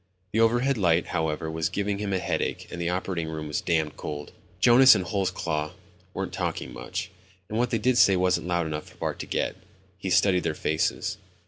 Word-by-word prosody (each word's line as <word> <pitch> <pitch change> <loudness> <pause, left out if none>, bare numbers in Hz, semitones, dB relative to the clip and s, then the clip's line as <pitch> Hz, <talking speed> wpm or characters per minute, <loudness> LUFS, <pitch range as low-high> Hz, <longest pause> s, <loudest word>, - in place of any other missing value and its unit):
The 110 - 0
overhead 120 +3 +3
light, 85 -3 +2
however, 80 0 -1
was 80 0 -1
giving 100 0 -2
him 105 -1 -2
a 95 - +1
headache - - -2
and 85 - -5
the 85 - 0
operating 90 -2 -2
room 80 -1 -5
was 75 - -2
damned 80 -3 0
cold. 75 -1 -6 0.3
Jonas 125 +4 +8
and 95 -3 -1
Holsclaw 85 -4 -2 0.4
weren't - - -3
talking - - -3
much, 95 - -5 0.4
and 110 - -2
what 125 0 +2
they 115 - +1
did 125 +3 +2
say 95 - +6
wasn't 90 -1 +1
loud 85 -1 +1
enough 75 -1 -4
for - - -20
Bart - - -3
to - - -5
get. - - -1 0.4
He 95 - -3
studied 90 0 +4
their 80 -2 -2
faces. 80 0 -1
90 Hz, 200 wpm, -26 LUFS, 80-100 Hz, 0.4 s, Jonas